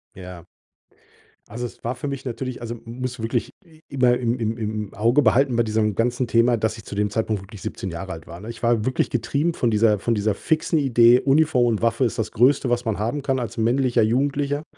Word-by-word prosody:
Ja. 90 -2 -10 1.0
Also, 120 +3 -5
es - - -10
war 120 +2 -2
für 145 - -5
mich 140 -1 -6
natürlich 125 +1 -5
also, 120 0 -5
musst 125 +2 -5
du - - -6
wirklich 120 +2 -2
i 160 -1 -21
immer 125 -2 +2
im 120 0 -1
im 115 -1 -2
im 105 -2 -4
Auge 115 +8 +3
behalten 130 +2 +3
bei 120 - +3
diesem 110 -2 0
ganzen 120 +3 0
Thema, 115 +1 +3
dass 110 +1 -1
ich 110 - -11
zu - - -9
dem 105 0 0
Zeitpunkt 110 -1 -1
wirklich 100 0 -12
17 95 - -5
Jahre 90 +3 -6
alt 80 -3 -9
war, 85 +2 -10
ne? 110 - -8
Ich 115 - -9
war 115 -2 +2
wirklich 130 - 0
getrieben 160 +4 -1
von 120 -6 0
dieser 105 -1 +3
von 115 - 0
dieser 105 -1 0
fixen 160 - 0
Idee, 120 -3 +5
Uniform 140 -2 +3
und 110 -2 0
Waffe 115 +2 +1
ist 115 -2 -1
das 110 - -2
Größte, 125 +3 +3
was 120 0 0
man 110 -2 -2
haben 120 +7 -2
kann 135 -1 -1
als 115 -4 -5
männlicher 120 +2 +2
Jugendlicher. 140 +5 0
120 Hz, 225 wpm, -22 LUFS, 110-130 Hz, 1.0 s, Idee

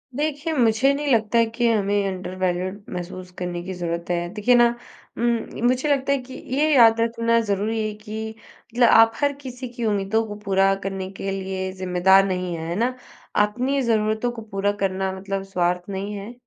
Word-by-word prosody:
देखिए, 300 +2 -2
मुझे 245 0 +3
नहीं 285 -1 0
लगता 225 0 +2
है 230 - +5
कि 235 +2 -1
हमें 200 -1 +1
अंडरवैल्यूड 185 +1 -3
महसूस 180 +1 -6
करने 175 -1 -3
की 185 +1 -5
ज़रूरत 170 -1 -3
है। 175 0 0
देखिए 220 +4 +3
ना 240 0 +6 0.5
उम, 235 0 -1
मुझे 255 +4 +1
लगता 280 -1 +1
है 280 - +3
कि 255 +1 -12 0.2
ये 305 +2 +3
याद 230 -2 +6
रखना 230 0 +2
ज़रूरी 210 +1 -1
है 215 - -4
कि 220 0 -5 0.5
मतलब 245 -1 +5
आप 225 0 +7
हर 285 +2 +1
किसी 255 -1 -7
की 240 -1 -5
उम्मीदों 210 +2 +1
को 210 - -6
पूरा 195 0 +3
करने 195 -1 -4
के 195 0 -4
लिए 190 -1 -3
ज़िम्मेदार 185 +1 +4
नहीं 180 -2 -2
हैं। 160 0 -5
है 170 - -2
ना? 245 +5 0 0.4
अपनी 250 +7 +1
ज़रूरतों 220 0 +1
को 235 - -8
पूरा 195 +1 +1
करना 190 0 0
मतलब 195 0 -3
स्वार्थ 180 -1 -1
नहीं 200 +1 -4
है, 205 +4 -7
210 Hz, 185 wpm, -23 LUFS, 190-235 Hz, 0.5 s, आप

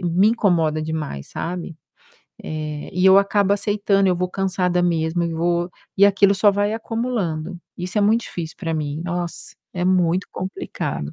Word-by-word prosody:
me 180 +5 +4
incomoda 170 -9 +2
demais, 155 - -4
sabe? 170 -1 -5 0.7
É, 155 -1 -5
e 180 +1 +1
eu 190 +1 +8
acabo 200 0 +2
aceitando, 200 -1 +2
eu 180 - +2
vou 180 +1 0
cansada 180 -2 0
mesmo 170 0 +1
e 165 -1 -2
vou 175 +1 0 0.3
e 200 +1 +6
aquilo 200 0 +4
só 205 +2 +5
vai 205 +1 0
acumulando. 215 -8 -3 0.2
Isso 180 +4 -3
é - - +3
muito 220 +3 +3
difícil 165 -6 -6
pra 165 -4 -3
mim, 155 0 -3
nossa, 175 -1 -4 0.2
é 180 0 -1
muito 180 0 +2
complicado. 180 - -4
180 Hz, 160 wpm, -21 LUFS, 165-200 Hz, 0.7 s, eu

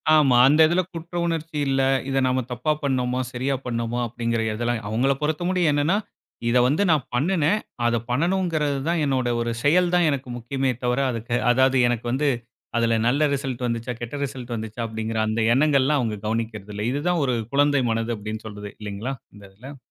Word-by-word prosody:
ஆமா. 135 -5 +5
அந்த 150 +3 +4
இதுல 175 +3 +2
குற்ற 170 +1 -8
உணர்ச்சி 165 -2 -3
இல்ல, 135 0 +2 0.3
இத 135 - 0
நாம 130 0 +1
தப்பா 125 +5 -1
பண்ணோமா 130 -2 0
சரியா 130 +3 -1
பண்ணோமா 115 0 -2
அப்டிங்கிற 115 0 -2
எதெல்லாம் 120 0 -1
அவங்கள 130 +5 +2
பொறுத்த 155 +3 -1
மட்டும் 180 -4 +2
என்னன்னா 145 +7 +2 0.5
இத 125 - +3
வந்து 150 +10 +2
நான் 150 -5 +2
பண்ணுனேன், 165 +7 +2 0.3
அத 120 0 +2
பண்ணனுங்கிறதுதான். 160 0 0
என்னோட 130 -3 0
ஒரு 115 0 -1
செயல் 175 +4 +4
தான் 175 -2 +4
எனக்கு 135 -3 -3
முக்கியமே 130 +2 -1
தவிர 125 +2 +1
அதுக்க 120 +1 -2
அதாது 130 +1 +3
எனக்கு 120 -1 -2
வந்து 145 +3 +1 0.5
அதுல 115 -1 +2
நல்ல 145 +4 +3
ரிசல்ட் 130 -2 -3
வந்துச்சா 115 +1 -3
கெட்ட 120 +4 -5
ரிசல்ட் 125 -2 -7
வந்துச்சா 110 +1 -5
அப்டிங்கிற 110 0 -3
அந்த 110 +1 0
எண்ணங்கள் 140 0 +3
எல்லாம் 145 +1 +2
அவங்க 110 -3 -2
கவனிக்கிறது 110 -2 -3
இல்ல. 105 - -3
இதுதான் 165 +4 0
ஒரு 125 -2 +1 0.2
குழந்தை 145 -1 +3
மனது 115 +1 -1
அப்டின்னு 110 +2 -6
சொல்றது. 105 -1 -8
இல்லைங்களா 105 +6 -4 0.2
இந்த 100 - -14
இதுல? 130 +8 -11
130 Hz, 175 wpm, -23 LUFS, 115-150 Hz, 0.5 s, ஆமா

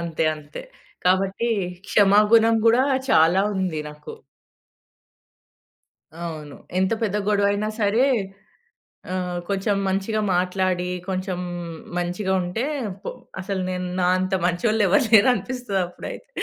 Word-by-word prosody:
అంతే. 165 -1 -2
అంతే. 145 0 -10 0.4
కాబట్టి 195 +5 +1 0.4
క్షమా 205 0 +5
గుణం 225 0 +6
గూడా 240 +3 +5 0.3
చాలా 165 +4 +5
ఉంది 180 -5 -1
నాకు. 150 0 -10 2.0
అవును. 155 -4 -7 0.2
ఎంత 190 +2 +2
పెద్ద 210 -2 0
గొడవైనా 205 +1 +1
సరే 215 +5 +3 1.1
ఆహ్, 180 -1 -2
కొంచెం 200 +1 0
మంచిగా 195 +3 -1
మాట్లాడి 180 0 0 0.2
కొంచెం 185 -1 -3 0.6
మంచిగుంటే 180 +3 -1 0.4
పొ - - -5 0.3
అసలు 190 0 -3
నేను 180 0 -3
నా 180 - +2
అంత 185 +1 -2
మంచోళ్ళెవరు 205 +4 +2
లేరనిపిస్తది 225 -1 +3
అప్పుడైతే. 335 - -9
190 Hz, 100 wpm, -23 LUFS, 180-210 Hz, 2.0 s, గుణం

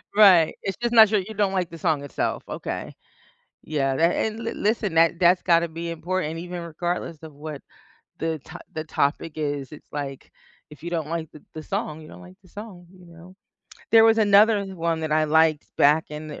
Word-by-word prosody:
Right, 185 -7 +6
it's 195 -2 -3
just 240 0 -1
not 220 -2 +8
your 210 - +3
you 220 +4 -9
don't 200 -1 +1
like 180 -3 -1
the 165 - -10
song 155 -3 0
itself, 145 - -3
okay. - - -5 0.7
Yeah, 135 -3 -1
that 165 +3 +2
and 220 +1 -2
li 230 0 -4
listen, 210 -3 -1
that 165 +1 +4
that's 180 0 +4
gotta 170 -1 +3
be 165 +1 -6
important 165 -1 -3
even 175 0 -6
regardless 170 0 -4
of 155 - -10
what 150 0 -8 0.6
the 160 -1 -2
to 160 +5 -11
the 155 - -4
topic 150 +1 -1
is, 145 -3 -3
it's 150 - -13
like, 140 -2 -6 0.4
if 150 - -15
you 170 - -4
don't 160 -3 -3
like 165 -2 -4
the 155 - -15
the 155 - -7
song, 155 +1 -4
you 155 - -12
don't - - -13
like 185 +1 -15
the 185 - -21
song, 195 -4 -10
you 180 - -17
know? 170 +2 -15 0.6
There 225 0 +7
was 225 0 +5
another 205 0 +5
one 165 -1 -1
that 155 -1 -2
I 155 0 +3
liked 155 0 +3
back 150 +3 +4
in 150 +1 -7
the - - -8
165 Hz, 210 wpm, -24 LUFS, 155-185 Hz, 0.7 s, not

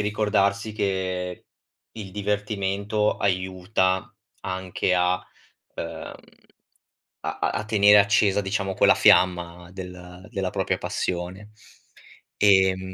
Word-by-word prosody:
ricordarsi 105 0 0
che 95 -3 -3 0.5
il 105 -4 -8
divertimento 105 +1 -1
aiuta 95 +2 0 0.3
anche 95 0 -1
a 90 +1 +2 0.5
ehm, 85 -1 -6 1.1
a - - -4
a - - +1
a 110 - -3
tenere 105 -1 +5
accesa 100 0 +3
diciamo 95 -1 -2
quella - - +5
fiamma 90 -1 +3
del 90 0 -10
della 95 -2 -2
propria - - -1
passione. 90 +4 -4 0.9
Ehm 95 -2 +3
95 Hz, 95 wpm, -24 LUFS, 90-105 Hz, 1.1 s, tenere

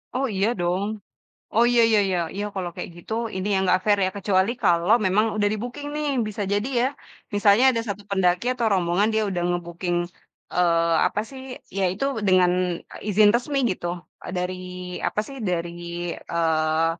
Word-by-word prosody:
Oh, 270 +1 +1
iya 195 +2 +2
dong. 175 +3 0 0.7
Oh 230 +2 +5
iya 240 -1 +4
iya 220 - +5
iya. 185 -2 0 0.2
Iya, 205 +1 -3
kalau 185 -3 -3
kayak - - -6
gitu, 175 - -9 0.2
Ini 190 +2 -3
yang 190 - +2
enggak 185 0 +3
fair 205 -1 +4
ya? 185 - 0
Kecuali 195 +1 +2
kalau 175 +5 +4
memang 205 +4 +3
udah 205 -1 +2
di-booking, 245 +7 -5
nih. 300 0 -2 0.2
Bisa 210 0 -4
jadi 205 +5 0
ya, 255 - +3 0.5
misalnya, 205 +4 +5
ada 230 -3 -1
1 200 0 -4
pendaki 180 +2 +2
atau 240 -3 -1
rombongan 185 +3 +2
dia 220 - +2
udah 175 -2 -2
nge-booking, 175 0 -2 0.6
eee, 170 -2 +3
apa 185 - -1
sih. 265 -1 -9 0.3
Ya, 195 - +1
itu 200 +8 -3 0.2
dengan, 185 -1 +5 0.4
eee, - - -9
izin 210 +1 +5
resmi 275 +4 0
gitu. 180 -2 -4 0.4
Eee, - - -6
dari 180 +1 -2 0.5
apa 210 - -1
sih, 275 - -9
dari 170 -1 -1 0.5
eee, 160 -1 +1
190 Hz, 175 wpm, -24 LUFS, 175-215 Hz, 0.7 s, Oh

